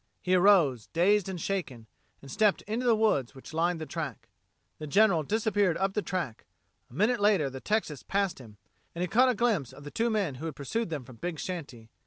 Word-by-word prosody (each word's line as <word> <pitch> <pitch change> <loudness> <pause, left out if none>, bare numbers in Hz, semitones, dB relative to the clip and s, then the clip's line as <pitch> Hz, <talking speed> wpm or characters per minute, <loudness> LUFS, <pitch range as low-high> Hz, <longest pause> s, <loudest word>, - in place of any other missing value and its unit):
He 185 - -1
arose, 175 - +4
dazed 195 +3 +2
and 185 -2 -5
shaken, 155 - -3 0.4
and 135 - -10
stepped 210 +3 +2
into 230 +4 -2
the 230 - +5
woods 150 - +1
which 135 +3 -12
lined 170 +1 +1
the 155 - -5
track. 150 -7 -6 0.5
The 155 - -6
General 195 +1 +4
disappeared 205 0 +1
up 195 0 0
the 210 - 0
track; 175 - -4 0.4
a - - -18
minute 220 - +2
later 200 -9 +3
the 130 0 -8
Texas 210 -10 -1
passed 195 -4 -1
him, 110 -5 -13 0.4
and 175 - -2
he - - 0
caught 255 +7 +4
a 250 - +1
glimpse 210 - 0
of 145 - -13
the 145 - -8
two 230 +1 0
men 200 - 0
who 165 - -3
had 155 - -6
pursued 225 - -3
them 150 -5 -4
from 125 -2 -13
Big 175 +5 -4
Shanty. 145 -11 -7
180 Hz, 215 wpm, -29 LUFS, 145-210 Hz, 0.5 s, the